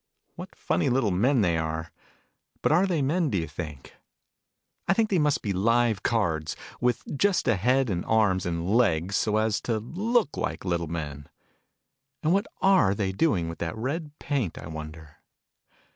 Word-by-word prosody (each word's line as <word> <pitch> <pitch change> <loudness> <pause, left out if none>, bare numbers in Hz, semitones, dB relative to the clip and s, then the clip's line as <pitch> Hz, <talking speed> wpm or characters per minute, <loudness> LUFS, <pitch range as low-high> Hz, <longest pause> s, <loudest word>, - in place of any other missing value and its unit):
What - - -10
funny 85 - 0
little 125 -5 +2
men 120 +8 +3
they 85 -4 +2
are! 80 +1 -3 0.7
But - - +3
are 175 +5 +4
they 165 -6 0
men, 160 +3 +1
do 100 - 0
you 80 - -2
think? 75 -2 -8 0.9
I 195 - +4
think 220 -1 +1
they 185 - +3
must 150 -2 +1
be 100 - -1
live 115 +2 +2
cards, 80 -9 0 0.2
with 125 0 0
just 195 +3 +1
a 115 - +4
head, 125 +7 +2
and 90 -5 -2
arms, 100 -5 +2
and 85 0 -2
legs, 100 -4 +2
so 105 +1 +1
as 110 -1 +1
to 115 -2 -1
look 195 - 0
like 80 +3 -3
little 85 -2 -1
men. 75 -3 -6 0.9
And 155 +3 +3
what 200 +1 +1 0.2
are 190 - +4
they 100 -2 -1
doing 95 - +1
with 85 - -7
that 85 +6 -3
red 150 +5 -4
paint, 130 - -2
I - - -8
wonder 80 -1 -9
105 Hz, 175 wpm, -26 LUFS, 85-140 Hz, 0.9 s, are